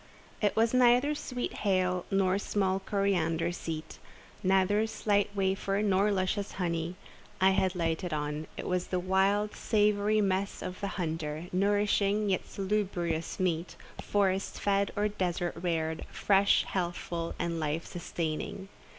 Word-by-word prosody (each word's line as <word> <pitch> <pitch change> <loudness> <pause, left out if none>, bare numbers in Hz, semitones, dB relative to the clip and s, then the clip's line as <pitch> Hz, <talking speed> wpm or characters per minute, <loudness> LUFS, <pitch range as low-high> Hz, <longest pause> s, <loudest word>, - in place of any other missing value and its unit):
It 205 -2 +2
was 225 +1 +3
neither 250 +3 +5
sweet 250 -4 -4
hail 185 -3 +1
nor 195 -1 +2
small 195 -2 0
coriander 175 -4 0
seed—neither 190 +5 -1
slight 205 -2 +1
wafer, 195 +1 0
nor 200 0 +3
luscious 195 +1 -1
honey, 170 -1 -2 0.4
I 190 0 +5
had 190 -1 +1
lighted 170 +1 -1
on; 150 0 -3
it - - -5
was 180 0 -1
the 185 - -1
wild, 195 +3 +1
savoury 210 0 +2
mess 195 -1 0
of 185 +2 -6
the 200 - -1
hunter, 160 -2 -3
nourishing 205 +1 +2
and 185 - -1
salubrious 185 -5 -2
meat, 175 -2 -1 0.3
forest 195 -1 0
fed 200 0 +1
or 205 +1 +2
desert 180 -4 -2
reared, 165 -2 -2
fresh, 200 0 +3
healthful, 175 -2 -3
and 170 -1 -2
life 155 +1 -2
sustaining. 175 +2 -4
190 Hz, 130 wpm, -30 LUFS, 170-205 Hz, 0.4 s, neither